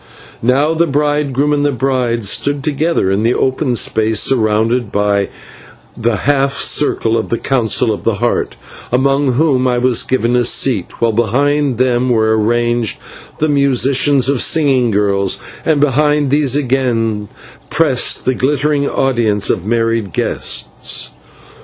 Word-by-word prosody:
Now 135 +6 +1
the 170 +1 +1
bridegroom 145 -1 0
and 145 -1 0
the 145 - +1
bride 125 -3 -1
stood 145 +7 0
together 150 - 0
in 100 +2 0
the 115 +2 +1
open 130 -1 -1
space 110 0 +1
surrounded 110 -1 +1
by 100 -1 0 0.7
the 115 -1 -1
half 140 +3 0
circle 115 -5 +1
of 110 - -5
the 115 - -1
Council 120 -3 0
of - - -7
the 115 - 0
Heart, 120 +3 -2 0.4
among 135 +1 +1
whom 130 -2 +1
I 125 -1 0
was 125 -1 +2
given 125 -2 0
a 125 - +2
seat, 120 -4 0
while 115 -1 +1
behind 135 +4 0
them 125 0 +1
were 110 -2 +2
arranged 120 0 0 0.4
the 155 - 0
musicians 140 -1 +2
and 140 -2 +1
singing 135 -6 +2
girls, 100 -2 0 0.3
and 155 -3 +1
behind 150 0 +1
these 140 -2 +2
again 120 -6 -1 0.4
pressed 150 -6 +1
the 130 - +1
glittering 145 +2 0
audience 115 -6 0
of 90 - -3
marriage 115 -3 -1
guests. - - -1
125 Hz, 140 wpm, -14 LUFS, 115-140 Hz, 0.7 s, was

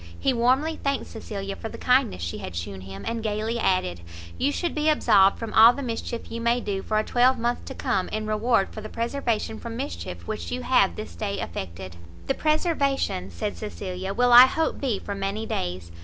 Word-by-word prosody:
He 270 - +2
warmly 260 +7 +2
thanked 275 -1 0
Cecilia 200 -3 -6
for 225 - -6
the - - -9
kindness 250 - +2
she 85 - -4
had 85 - -7
shewn 95 +3 -5
him, 95 +1 -9
and 230 0 -2
gaily 220 +2 -2
added, 185 - 0 0.3
"You 280 - +1
should 345 +3 -2
be 305 0 +1
absolved 200 -10 +4
from 230 -2 -6
all 225 +2 +8
the 280 - -5
mischief 235 -1 -5
you 230 0 -4
may 235 +1 +2
do 200 -4 -3
for 215 - -1
a 215 - +2
twelvemonth 245 0 +2
to - - -7
come, 185 -2 -1
in 215 0 -3
reward 215 0 +1
for 215 - -7
the 215 - -7
preservation 230 -2 -2
from 230 -1 -6
mischief 90 - -5
which 85 0 -4
you 85 0 -3
have 85 - +3
this 85 - -7
day 100 +4 -3
effected." 85 0 -6 0.3
"The - - +1
preservation," 285 - 0
said 90 +1 -4
Cecilia, 180 - -5
"will 245 +4 +3
I 250 +2 +11
hope 320 +4 -1
be 250 -7 0
for 200 - -5
many 200 +2 -3
days. 90 - -4
220 Hz, 200 wpm, -25 LUFS, -, 0.3 s, I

